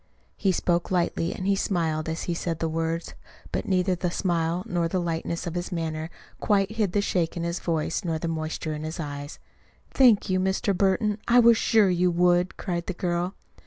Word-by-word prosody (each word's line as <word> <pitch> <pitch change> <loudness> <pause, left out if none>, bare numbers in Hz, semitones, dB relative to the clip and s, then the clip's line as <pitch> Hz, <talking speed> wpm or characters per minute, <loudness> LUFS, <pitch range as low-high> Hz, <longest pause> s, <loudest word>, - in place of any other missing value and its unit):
He 195 - +1
spoke 175 -1 0
lightly, 175 -2 0
and 185 - -5
he 200 0 +3
smiled 160 -5 -1
as 160 - -3
he 175 - -2
said 165 -1 -2
the 165 - -1
words; 165 +1 -2 0.4
but - - -2
neither 185 -1 +2
the 180 0 -1
smile 170 -1 0
nor 175 -2 0
the 185 +2 -1
lightness 170 0 -2
of 170 - -4
his 175 0 -4
manner 160 -2 -3 0.3
quite 200 -1 +2
hid 215 -5 -1
the 205 - +2
shake 175 -4 -1
in 170 - -2
his 170 +1 -2
voice 165 -1 -1
nor 165 -3 -1
the 165 - -3
moisture 160 -1 -3
in 150 0 -5
his 160 +2 -5
eyes. 145 -1 -6 0.5
"Thank 240 -7 +5
you, 185 -1 +1
Mr. 190 +2 0
Burton. 200 +3 +1
I 245 +1 +6
was 235 -1 +7
sure 220 -3 +3
you 180 0 +2
would," 175 +1 +2
cried 175 -3 -3
the 185 - -3
girl. 175 +1 -1
175 Hz, 200 wpm, -26 LUFS, 165-190 Hz, 0.5 s, was